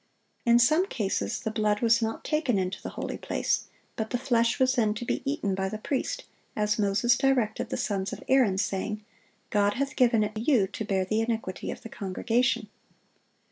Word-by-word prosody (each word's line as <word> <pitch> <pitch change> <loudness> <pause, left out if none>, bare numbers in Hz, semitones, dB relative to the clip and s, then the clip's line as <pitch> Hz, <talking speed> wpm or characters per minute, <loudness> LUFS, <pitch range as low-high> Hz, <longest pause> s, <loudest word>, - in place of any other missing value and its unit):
In 235 0 +7
some 310 +10 +4
cases 210 - -2
the 220 - -2
blood 215 -1 +1
was 230 0 +4
not 225 0 -2
taken 305 -8 +1
into 185 0 -2
the - - -5
holy - - -4
place; - - -1 0.3
but 220 0 -3
the 245 - 0
flesh 235 -3 +1
was 260 0 +4
then 220 -5 +1
to 240 - -5
be - - -1
eaten 205 -9 -1
by 190 0 -1
the 215 - -4
priest, 260 +5 -2 0.3
as 210 0 0
Moses 210 +4 +3
directed 250 -5 +1
the - - -2
sons 195 -3 -1
of - - -7
Aaron, 250 -8 +4
saying, 210 +1 -2 0.5
"God 205 0 +2
hath 275 +1 -2
given 235 -3 +4
it 210 +1 -3
you 225 -1 +3
to 205 - -5
bear 190 -2 0
the 215 +3 0
iniquity 225 -5 -3
of - - -6
the 230 - -8
congregation." 230 +5 0
220 Hz, 190 wpm, -27 LUFS, 205-245 Hz, 0.5 s, In